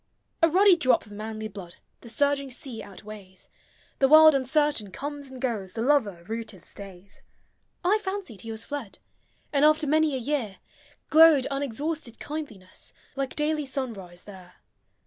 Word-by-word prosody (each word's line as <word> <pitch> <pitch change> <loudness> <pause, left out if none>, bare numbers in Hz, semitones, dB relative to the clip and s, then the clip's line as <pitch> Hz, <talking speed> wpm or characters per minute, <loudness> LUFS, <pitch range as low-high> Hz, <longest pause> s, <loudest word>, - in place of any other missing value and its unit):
A 330 - +6
ruddy 380 +3 +6
drop 255 -9 +2
of 210 - -16
manly 215 +1 -5
blood 190 -4 -10 0.2
The 235 - -12
surging 280 +2 0
sea 250 -2 -7
outweighs; 200 -1 -12 0.5
The 270 - +5
world 310 +2 +8
uncertain 275 -4 +1
comes 285 +6 -6
and 260 -1 -10
goes, 220 -8 -3
The 225 - -3
lover 225 -11 +1
rooted 220 -2 -6
stays. 195 -1 -13 0.6
I 415 +4 +4
fancied 380 - -5
he 225 - -9
was 220 0 -6
fled 280 -8 -6 0.3
— - - -40
And, 280 0 +3
after 310 +1 +4
many 310 0 +2
a - - 0
year, 245 -6 -2 0.5
Glowed 315 -4 +7
unexhausted 280 -1 -3
kindliness, 280 -12 -7 0.2
Like 275 -1 -3
daily 300 -1 -1
sunrise 210 -10 -6
there. 185 -3 -13
260 Hz, 150 wpm, -26 LUFS, 210-300 Hz, 0.6 s, world